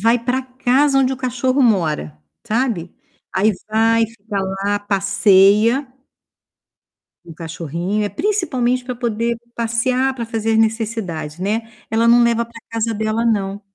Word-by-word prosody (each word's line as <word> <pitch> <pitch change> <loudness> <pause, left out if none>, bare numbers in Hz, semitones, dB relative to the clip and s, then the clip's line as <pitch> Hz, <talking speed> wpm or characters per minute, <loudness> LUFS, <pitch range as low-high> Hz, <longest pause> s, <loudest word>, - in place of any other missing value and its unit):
vai 230 +3 +3
para 250 +3 -1
casa 260 +2 +2
onde 265 0 +2
o - - -4
cachorro 255 +1 0
mora, 160 - +1 0.3
sabe? 220 -7 -1 0.4
Aí 210 +3 +3 0.2
vai, 225 +1 +3
fica 210 -2 -6 0.3
lá, 205 0 +1
passeia 200 +5 +3 1.4
com 170 - -13
o - - -10
cachorrinho. 170 +5 -3
É 205 - -1
principalmente 255 - 0
para 250 0 -4
poder 235 -1 -1 0.2
passear 250 +3 0
para 235 -3 -4
fazer 225 -1 -1
as 220 - +3
necessidades, 215 -9 -1
né. 220 +4 -2 0.2
Ela 225 +1 +2
não 240 0 +6
leva 235 0 +2
para 230 0 -14
casa 230 0 -1
dela 220 +2 -1
não. 200 -3 0
225 Hz, 145 wpm, -19 LUFS, 205-245 Hz, 1.4 s, não